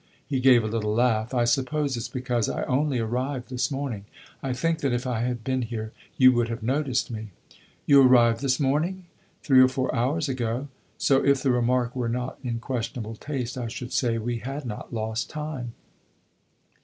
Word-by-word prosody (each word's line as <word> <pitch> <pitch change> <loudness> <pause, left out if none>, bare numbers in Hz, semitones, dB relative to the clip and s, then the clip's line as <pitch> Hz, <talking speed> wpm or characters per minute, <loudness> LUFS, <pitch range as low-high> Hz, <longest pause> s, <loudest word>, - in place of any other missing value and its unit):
He 135 -3 -1
gave 125 -2 +6
a - - -1
little 105 -1 -1
laugh. 115 -1 +2
"I 125 -2 +2
suppose 135 +3 0
it 120 - -3
's - - -4
because 125 -3 -1
I - - -2
only 135 +1 +1
arrived 125 +3 -2
this 125 -1 0
morning. 135 -8 -4 0.4
I 135 - -2
think 160 +6 0
that 140 -5 0
if 120 +1 -1
I 125 -3 -1
had 120 -1 -2
been 130 +1 0
here 110 -2 -4 0.3
you 130 -1 +8
would 120 -2 +1
have 115 0 -5
noticed 130 0 0
me." 110 -1 -5 0.6
"You 140 -1 +7
arrived 120 -3 +5
this 135 -2 +1
morning?" 160 +7 0 0.4
"Three 135 -3 +5
or 130 - +7
four 130 0 -2
hours 140 +6 0
ago. 125 +1 -2 0.3
So, 135 -1 +3
if 140 -1 +3
the 135 - +3
remark 125 0 +1
were 125 -2 -1
not 125 +2 -3
in 120 -2 -2
questionable 115 -1 -4
taste, 130 -1 -4
I 120 - -3
should 120 +2 -6
say 120 -3 +1
we 115 +1 -2
had 135 +5 -5
not 105 -4 -6
lost 110 0 -3
time." 150 -6 -5
125 Hz, 190 wpm, -26 LUFS, 115-135 Hz, 0.6 s, you